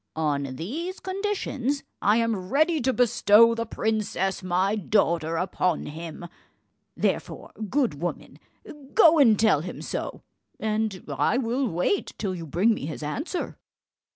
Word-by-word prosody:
On 140 -4 -1
these 315 - -5
conditions 375 - -2 0.2
I 210 +2 +4
am 220 -6 -1
ready 310 +4 +2
to 260 +2 +2
bestow 230 -2 +5
the 230 0 -3
princess 215 -4 -1
my 185 +3 +1
daughter 170 -5 +1
upon 180 -1 0
him; 165 +2 -7 0.7
therefore, - - -2 0.2
good 240 - 0
woman, 175 - -5 0.6
go 330 -7 +7
and 225 -7 +5
tell 215 -9 +4
him 180 - -7
so, - - -5 0.4
and 215 -3 -1
I 235 - +1
will 255 +1 0
wait 180 - -1
till 195 -3 -2
you 170 -3 -6
bring 190 +10 +3
me 150 - -5
his 155 -1 -6
answer." 295 - -4
215 Hz, 135 wpm, -26 LUFS, 175-260 Hz, 0.7 s, go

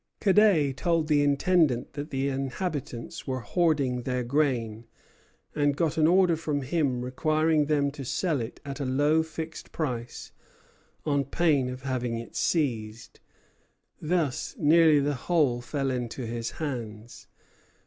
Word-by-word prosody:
Cadet 190 - +4
told 165 -2 +1
the 150 -2 +3
Intendant 145 -2 +2
that 145 +2 -6
the 135 0 -1
inhabitants 140 +1 -4
were 130 -1 -2
hoarding 140 - +1
their 125 0 -2
grain, 120 -5 -1 0.7
and 145 -1 +1
got 165 -2 0
an 155 -1 +4
order 180 -1 +4
from 150 -3 -2
him 130 -4 0
requiring 155 +3 +1
them 145 -2 +1
to 140 -1 -8
sell 150 +2 -1
it 115 - -7
at 140 0 -6
a - - -2
low 145 +5 +2
fixed 160 0 -7
price, 125 -6 -4 0.7
on 145 -2 +1
pain 140 -2 +1
of 130 +1 -7
having 125 -3 -2
it 115 -3 -9
seized. 115 -8 -2 0.8
Thus 155 - -1
nearly 160 -3 +5
the 145 +1 0
whole 140 -3 +1
fell 135 +1 -2
into 125 0 -4
his 115 0 -3
hands. 120 -7 -6
140 Hz, 140 wpm, -27 LUFS, 125-160 Hz, 0.8 s, nearly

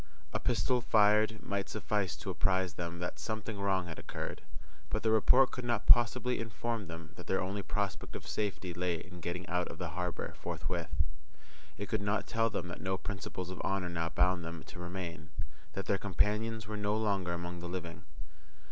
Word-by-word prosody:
A - - +1
pistol 120 +2 +2
fired 110 -1 +5
might 100 -1 -1
suffice 100 -5 0
to 75 - -4
apprise 95 -2 +2
them 85 0 -4
that 90 0 -3
something 110 -1 -3
wrong 95 -2 +2
had 80 -2 -6
occurred; - - -4 0.5
but 110 - 0
the 110 - +4
report 125 +4 +6
could 125 - -4
not 120 -3 0
possibly 125 +1 +6
inform 115 -1 -2
them 85 -1 -7
that 90 - -9
their 95 - +2
only 100 +2 -1
prospect 100 -1 -2
of - - -6
safety 100 -4 -1
lay 90 0 0
in 90 +2 -8
getting 90 +2 -3
out 90 -1 +1
of - - -7
the 90 -1 -3
harbour 90 +2 -2
forthwith—it 75 +3 -4
could 105 +1 0
not 100 +1 +1
tell 115 0 +2
them 85 - -2
that 85 - -6
no 95 0 0
principles 95 -2 -4
of 95 - -5
honour 95 -2 0
now 85 -1 -1
bound 90 +1 +3
them 85 -1 -5
to 95 - -10
remain, 85 -2 -5 0.4
that 95 - -3
their 100 - +2
companions 105 +3 +1
were 105 0 -4
no 105 +1 +1
longer 100 -5 +1
among 85 0 -4
the 85 0 -5
living. 85 -3 -5
95 Hz, 185 wpm, -33 LUFS, 85-105 Hz, 0.5 s, report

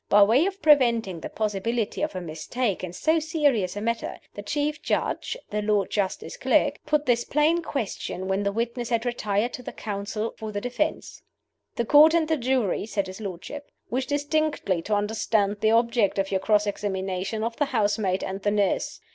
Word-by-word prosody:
By 205 0 +7
way 245 - +4
of 395 0 -6
preventing 235 - +4
the - - -6
possibility 215 +1 -2
of 305 0 -2
a 185 - -3
mistake 185 +7 -3
in 180 - -4
so 315 - +1
serious 290 - +1
a 205 - -4
matter, 230 +1 -2 0.2
the 205 - -7
Chief 295 +7 -2
Judge - - -1
(the 210 0 -1
Lord 210 -1 +1
Justice 200 -3 -2
Clerk) - - +2
put 300 0 +2
this 235 -2 +2
plain 310 +4 +2
question, 225 - -4
when 190 +1 0
the 200 0 0
witnesses 235 +2 -2
had 230 0 0
retired, 225 -1 -1
to - - -6
the - - -7
Counsel 210 +1 -4
for 220 -1 -5
the 205 - -2
defense: 250 +8 -3 0.5
"The 235 - -1
Court 305 +6 +7
and 325 -2 +2
the 320 - +2
jury," 245 -6 0
said 205 -3 -1
his 190 +3 -9
lordship, 205 +9 -7 0.2
"wish 255 +2 -1
distinctly 290 - 0
to 210 +5 -1
understand 205 0 0
the 215 - +3
object 230 -3 +2
of 195 0 0
your 190 - +1
cross 210 +1 +2
examination 195 +1 -2
of 230 0 -3
the 290 - +2
housemaid 205 -6 0
and 195 +1 -4
the 205 - +1
nurse. 205 -1 0
220 Hz, 190 wpm, -25 LUFS, 200-265 Hz, 0.5 s, By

